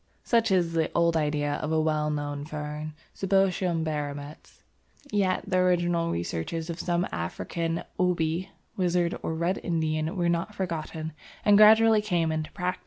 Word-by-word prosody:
Such 230 -1 +2
is 175 -3 +2
the 160 -1 +1
old 170 -1 +3
idea 145 -2 0
of 155 - -3
a 160 - +2
well 155 -1 +1
known 145 -1 -3
fern, 150 0 -6 0.2
Cibotium 190 -3 +1
barometz. 145 -1 -5 0.5
Yet 190 -3 +1
the 185 - +2
original 175 -2 +2
researches 125 - -3
of 165 - -7
some 175 0 0
African 165 - -3 0.2
"Obi" 180 0 0 0.3
wizard 175 -2 +1
or 160 - -3
red 170 +4 0
Indian 160 0 -1
were 175 -1 +1
not 170 +5 -1
forgotten, 160 -3 -4 0.3
and 205 - +6
gradually 220 +1 +7
came 175 -6 0
into 155 -1 -3
practice. 180 -1 -2
165 Hz, 150 wpm, -27 LUFS, 155-180 Hz, 0.5 s, gradually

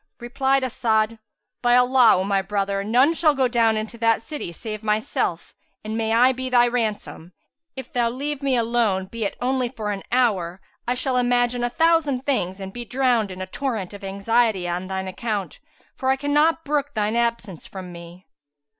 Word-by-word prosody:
Replied 265 +3 0
As'ad, 225 -3 0 0.4
"By 240 0 +4
Allah, 250 -1 +5
O 185 - 0
my 195 0 +1
brother, 200 0 -2
none 250 +9 +3
shall 310 -3 +3
go 265 -2 +2
down 230 -2 +2
into 220 +2 -5
that 230 -1 +2
city 290 - -6
save 215 +4 -7
myself, 215 0 -1 0.3
and 215 +1 -4
may 225 0 -1
I 245 +3 +5
be 260 0 -4
thy 245 -1 +5
ransom! 215 -7 -3 0.4
If 265 - -9
thou 240 -1 +2
leave 280 +4 -4
me 275 -2 +1
alone, 225 -5 +1
be 220 +3 -5
it 200 - -4
only 255 0 0
for 220 -4 -4
an 200 -1 -4
hour, 195 -8 +1 0.3
I 245 - +1
shall 255 0 -1
imagine 245 0 +1
a 240 - +1
thousand 320 -3 +2
things 190 -9 -1
and 190 0 -7
be 240 - -6
drowned 245 -4 +1
in 185 0 -6
a - - -4
torrent 215 -2 -4
of 200 - -10
anxiety 200 0 +1
on 175 +2 -3
shine 190 0 -3
account, 200 +1 -4 0.4
for 260 - -2
I 265 - +4
cannot 295 +4 +1
brook 290 0 -1
shine 210 +1 0
absence 235 -7 -2
from 185 -2 -8
me." 170 +2 -12
235 Hz, 185 wpm, -23 LUFS, 200-255 Hz, 0.4 s, Allah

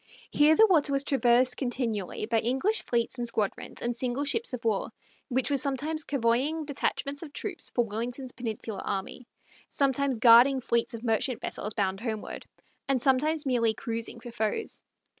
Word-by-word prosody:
Here 300 +2 +5
the 445 - +7
water 315 -8 +3
was 275 0 +1
traversed 250 -2 +3
continually 235 -7 -2
by 225 0 +1
English 265 - +1
fleets 235 +1 0
and 240 - -1
squadrons 215 -4 -3
and 240 0 -1
single 250 +3 -2
ships 450 +9 0
of 250 -3 -6
war, 215 -3 0 0.4
which 260 +1 0
were 280 - +3
sometimes 290 +4 -1
covoying 275 +5 0
detachments 285 0 -2
of 320 -4 -8
troops 380 +1 -1
for 240 - +1
Wellington's 245 +4 -4
Peninsular 220 -4 -5
army, 200 +5 -5 0.4
sometimes 275 -2 +1
guarding 240 +4 +7
fleets 235 -1 0
of 230 - -9
merchant 230 +1 0
vessels 210 0 -4
bound 195 -2 -1
homeward, 220 -2 -5 0.4
and 270 -2 +2
sometimes 295 +4 +2
merely 230 -4 +2
cruising 230 +1 -4
for 240 +1 -9
foes. 225 - -2
250 Hz, 160 wpm, -28 LUFS, 230-280 Hz, 0.4 s, the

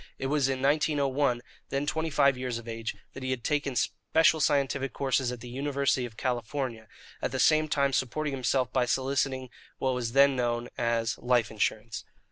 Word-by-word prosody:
It - - -4
was 140 -3 +2
in 130 0 -2
1901, 140 -3 +2 0.3
then 140 +1 -1
twenty 160 +2 -1
five 140 -2 +4
years 125 -2 -3
of 115 0 -9
age, 115 0 -4 0.2
that 130 - -8
he 130 - -3
had 130 -2 -2
taken 145 -2 0
special 160 +6 +2
scientific 140 -2 +1
courses 130 -2 0
at 125 -2 -7
the 125 - -8
University 135 0 0
of 110 -2 -16
California, 120 -2 -3 0.3
at - - -1
the 130 - -2
same 155 +3 +4
time 140 -2 +1
supporting 140 +4 -1
himself 130 -1 0
by 125 - +2
soliciting 130 0 0 0.3
what 130 -1 0
was 120 -2 -3
then 140 0 +6
known 120 -1 -1
as 115 -1 0
"life 120 -3 +2
insurance." 110 0 -2
130 Hz, 180 wpm, -28 LUFS, 120-140 Hz, 0.3 s, then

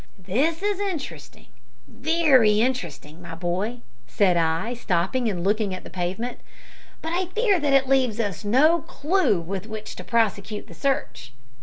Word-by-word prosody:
"This 310 - 0
is 410 -1 0
interesting, 290 - -5 0.4
very 270 -8 +3
interesting, 175 - -2
my 170 -2 -8
boy," 185 +8 -2 0.3
said 185 +7 +2
I, 165 +7 0
stopping 220 +2 0
and 180 -4 -3
looking 205 -1 +1
at 185 - -9
the - - -11
pavement; 190 +7 -3 0.6
"but 325 +1 -3
I 365 +1 0
fear 410 0 +2
that 290 -2 +1
it 270 -1 +4
leaves 255 -5 +2
us 205 -6 -2
no 300 +10 +4
clew 310 - +1
with 190 +4 -5
which 215 -1 -7
to - - -7
prosecute 210 -2 0
the - - -13
search." 265 - -2
225 Hz, 155 wpm, -24 LUFS, 185-285 Hz, 0.6 s, it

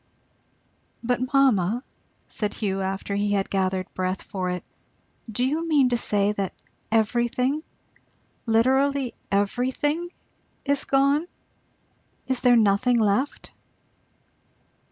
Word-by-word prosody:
"But 250 +1 -1
mamma," 245 -5 +3 0.4
said 210 -2 -3
Hugh, 195 -3 -2
after 195 +1 -3
he 205 0 0
had 195 -1 -1
gathered 190 -1 -1
breath 185 +1 -2
for 185 -2 -3
it, 180 -1 -3 0.7
"do 245 +4 0
you 315 +5 -1
mean 285 -5 +4
to 240 - +1
say 205 -3 +2
that 200 -3 -3 0.4
everything, 240 +5 +1 0.9
literally 265 +3 +2 0.2
everything, 260 - 0 0.6
is 280 -1 +1
gone? 280 +4 +2 1.0
is 260 -2 0
there 245 -1 +5
nothing 225 +3 +3
left?" 220 +6 0
240 Hz, 105 wpm, -25 LUFS, 200-270 Hz, 1.0 s, there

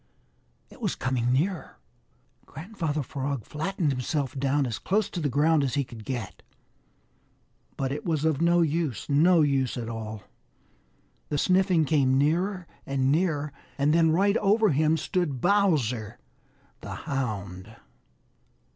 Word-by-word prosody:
It - - -16
was - - -1
coming 125 -2 -1
nearer. 165 +7 -1 0.7
Grandfather 160 -2 -4
Frog 135 -2 -4
flattened 160 0 -2
himself 135 +1 -2
down 140 +1 +1
as 120 -3 -4
close 200 +1 0
to 180 - -4
the 150 -3 0
ground 150 +2 +3
as 135 -1 -1
he 140 - +1
could 120 -4 -11
get. 120 -7 -5 1.4
But 135 -1 -2
it 145 - -4
was 160 -3 -1
of 160 -2 +1
no 170 +1 +4
use, 160 -5 -2
no 165 +4 +5
use 135 -3 0
at 115 -2 -4
all. 110 -2 -6 1.1
The 150 - -1
sniffing 185 0 +3
came 135 -3 +2
nearer 175 +6 0 0.2
and 135 -1 0
nearer, 150 -3 0 0.2
and 145 +2 +2
then 165 -1 +4
right 200 +6 +3
over 210 +1 +3
him 155 +1 +2
stood 160 -4 -2
Bowser 140 - +1 0.6
the - - -7
Hound! 105 -6 -4
145 Hz, 140 wpm, -26 LUFS, 130-170 Hz, 1.4 s, no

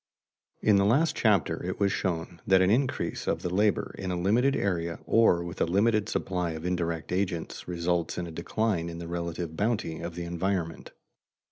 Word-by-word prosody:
In 105 -2 +5
the 100 - +4
last 140 +10 +3
chapter 105 -6 +2
it - - -4
was 100 -1 +3
shown 85 -2 -3
that 95 -1 +6
an 95 - +3
increase 130 +4 0
of - - 0
the 90 - -2
labor 105 +1 +1
in 95 - -3
a 90 -1 -1
limited 120 +9 +3
area 85 -6 -1
or 100 -7 +4
with 85 -1 -6
a - - +5
limited 105 +4 +2
supply 90 -3 -1
of 80 +1 -7
indirect 85 -3 -2
agents 90 -3 -2
results 85 -1 -1
in 90 - -2
a 85 - -7
decline 85 +1 -1
in 85 - -7
the 85 0 -6
relative 85 -1 -4
bounty 105 -5 -1
of 85 0 -6
the 90 - -4
environment. 85 -1 -2
90 Hz, 190 wpm, -28 LUFS, 85-100 Hz, -, that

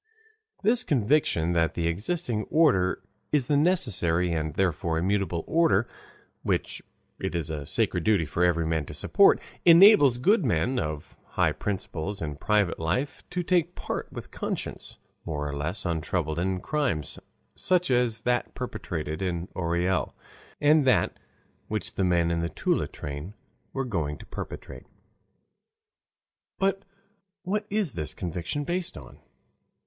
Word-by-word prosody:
This 235 +4 +4
conviction 120 - +2
that 80 -1 +1
the 85 - -1
existing 110 - -1
order 125 - +2 0.3
is 145 -4 +3
the 145 - +1
necessary 100 - +2
and 80 -1 -1
therefore 85 -3 0
immutable 95 -1 0
order, 120 - +3 0.5
which - - -1 0.4
it 95 -2 -3
is 80 -2 -2
a 75 -2 -5
sacred 90 - 0
duty 100 -4 +3
for 85 +4 -1
every 85 -2 +2
man 80 -3 -1
to - - -8
support, - - +4 0.2
enables 170 - +8
good 195 - +3
men, 115 - +1
of 75 -1 -5 0.2
high - - +3
principles 95 -1 -4
in 75 -5 -4
private 105 +1 +1
life, 85 - -1
to 180 0 -2
take 175 -1 +1
part - - -5
with - - -9
conscience - - -5 0.3
more 75 -3 -3
or 70 - -4
less 85 +8 -3
untroubled 80 -1 -1
in 95 +1 -1
crimes 125 - -2 0.3
such 180 -4 +1
as 120 -2 +2
that 125 0 -1
perpetrated 80 -10 -4
in 90 -2 -2
Orel, 90 +1 0 0.4
and 150 +1 +5
that 130 -1 +3 0.5
which 110 0 -3
the 95 - -1
men 85 -2 +2
in 85 - 0
the 85 0 -1
Toula - - 0
train 75 +8 -7 0.4
were 135 0 -2
going 80 - -2
to - - -12
perpetrate. - - -8 1.7
But 195 0 0 0.6
what 205 +3 -2
is 205 -6 0
this 75 - -5
conviction 90 - -3
based 180 +3 -2
on? - - -12
95 Hz, 140 wpm, -27 LUFS, -, 1.7 s, enables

